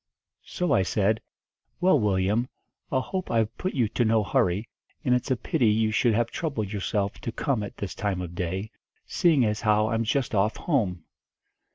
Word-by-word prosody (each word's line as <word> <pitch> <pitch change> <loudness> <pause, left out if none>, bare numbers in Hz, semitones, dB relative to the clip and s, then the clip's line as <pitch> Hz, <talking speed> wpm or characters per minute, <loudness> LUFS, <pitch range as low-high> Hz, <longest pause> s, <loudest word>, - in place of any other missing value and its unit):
"So 180 -1 -1
I - - +4
said, 105 +3 +1 0.6
'Well, 180 -5 +4
Willyum, 105 +4 +1 0.4
I 130 - +2
hope 185 +7 -4
I've 115 -2 +1
put 185 - -3
you 120 -5 +2
to 120 - 0
no 110 -1 +3
hurry, 100 +1 +1 0.4
and 125 - +3
it's 125 +3 0
a 130 - +3
pity 125 +1 0
you 110 +1 +2
should 115 0 +2
have 115 +1 0
troubled 110 - -3
yourself 100 0 -2
to 115 - -3
come 125 -1 -1
at 100 - -7
this 100 - -4
time 100 -4 -2
of 90 -2 -5
day, 95 +4 -3 0.3
seeing 155 -8 +3
as 105 0 -1
how 110 0 +3
I'm 115 0 0
just 125 +3 0
off 105 +2 +1
home.' 100 - 0
110 Hz, 185 wpm, -26 LUFS, 100-125 Hz, 0.6 s, I